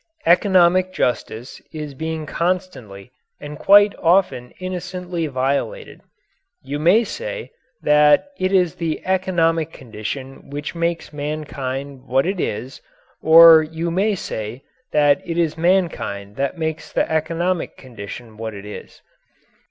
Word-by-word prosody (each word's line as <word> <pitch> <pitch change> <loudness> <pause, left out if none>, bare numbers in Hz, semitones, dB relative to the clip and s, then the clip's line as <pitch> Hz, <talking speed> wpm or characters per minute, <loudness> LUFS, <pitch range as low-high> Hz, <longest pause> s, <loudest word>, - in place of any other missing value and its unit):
Economic 185 +1 +4
justice 125 -5 -3
is 150 -3 -6
being 160 +2 -4
constantly 150 - -3 0.3
and 150 +1 -9
quite 205 +1 +6
often 170 -8 +2
innocently 180 -2 -4
violated. 140 - -2 0.6
You 145 +1 -4
may 180 +9 +4
say - - -6 0.3
that 150 - +4
it 185 0 0
is 180 -4 +3
the 165 -2 -4
economic 165 -4 +1
condition 130 +3 -8
which 145 +2 -5
makes 170 -2 -2
mankind 140 -2 -5
what 135 +3 +2
it 190 +1 -2
is; 120 +2 -4 0.4
or 165 0 +9
you 160 +2 -4
may 200 +4 +1
say 110 - -6 0.3
that 145 -1 +3
it 170 -1 -4
is 165 -3 +1
mankind 165 - -1
that 140 +6 -2
makes 160 -1 -4
the - - 0
economic 165 +3 -1
condition 115 -2 -10
what 110 -1 -6
it 100 0 -9
is. 105 - -10
160 Hz, 125 wpm, -20 LUFS, 135-180 Hz, 0.6 s, or